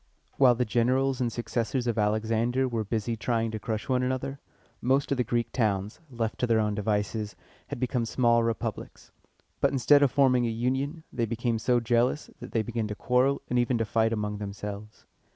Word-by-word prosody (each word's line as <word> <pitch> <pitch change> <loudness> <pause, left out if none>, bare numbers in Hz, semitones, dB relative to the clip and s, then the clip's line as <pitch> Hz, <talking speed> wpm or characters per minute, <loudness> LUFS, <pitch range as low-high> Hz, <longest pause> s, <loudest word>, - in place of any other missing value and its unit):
While 125 -3 +6
the 125 +1 0
generals 130 +4 +1
and 120 -2 0
successors 120 +2 -2
of 120 -2 0
Alexander 115 +4 +1
were 115 -3 -2
busy 110 +2 -2
trying 115 +1 -1
to 110 - -4
crush 110 0 -4
one 125 -1 +1
another, 130 +2 -2 0.4
most 135 +3 +1
of 140 - +1
the - - +3
Greek 120 0 -1
towns, 105 -3 -1
left 115 -3 -3
to 125 - +1
their 115 -1 +3
own 105 -1 +1
devices, 105 0 -2 0.3
had - - -6
become 125 -2 -1
small 115 0 +3
republics. 115 -1 -4 0.5
But 140 - +3
instead 140 +2 +5
of 140 - +5
forming 125 -3 +3
a - - 0
union, 130 +7 -2
they 120 -2 -1
became 115 0 -1
so 125 +2 +2
jealous, 120 +5 +1
that - - -9
they 115 - +1
began 115 -1 -3
to 105 - -5
quarrel 125 +5 +1
and 125 - +1
even 120 0 +1
to 115 - 0
fight 110 +2 +1
among 105 -2 -2
themselves. 105 +1 -7
115 Hz, 190 wpm, -27 LUFS, 110-125 Hz, 0.5 s, While